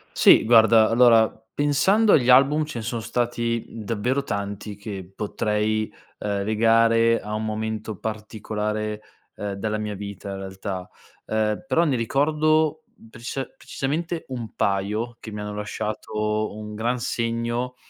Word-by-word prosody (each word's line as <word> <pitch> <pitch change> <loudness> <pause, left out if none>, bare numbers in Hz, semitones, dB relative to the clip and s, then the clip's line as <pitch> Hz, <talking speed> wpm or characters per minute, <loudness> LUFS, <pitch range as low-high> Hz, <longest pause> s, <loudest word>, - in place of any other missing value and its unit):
Sì, - - +7
guarda, 110 -1 +6
allora, 115 -2 +6 0.2
pensando 170 +10 +3
agli 125 -4 +4
album, 140 +4 +6
ce 150 -5 -6
ne 110 - -5
son 120 -1 -3
stati 120 -1 -1
davvero 115 +5 -2
tanti 100 0 -4
che 100 -3 -8
potrei, 105 +1 -1 0.3
uhm, 100 -1 -2
legare 115 +1 +3
a 105 +1 -5
un 110 - -2
momento 110 0 -3
particolare, 105 0 -4 0.4
uhm, 105 -1 -4
della 105 +2 -2
mia 105 -1 -3
vita 100 0 -7
in 95 - -5
realtà, 95 -1 -6 0.4
uhm, 110 0 -1
però 135 +6 +3
ne 145 -5 +1
ricordo 155 +5 +1 0.3
precisa 125 +3 -5
precisamente 165 +5 -3
un 120 -4 -6
paio 105 +4 -1
che 110 - -8
mi 105 - -6
hanno 105 0 -5
lasciato 105 +1 -3
un 105 0 -7
gran 120 +4 -1
segno, 120 +2 -2
110 Hz, 135 wpm, -24 LUFS, 105-125 Hz, 0.4 s, Sì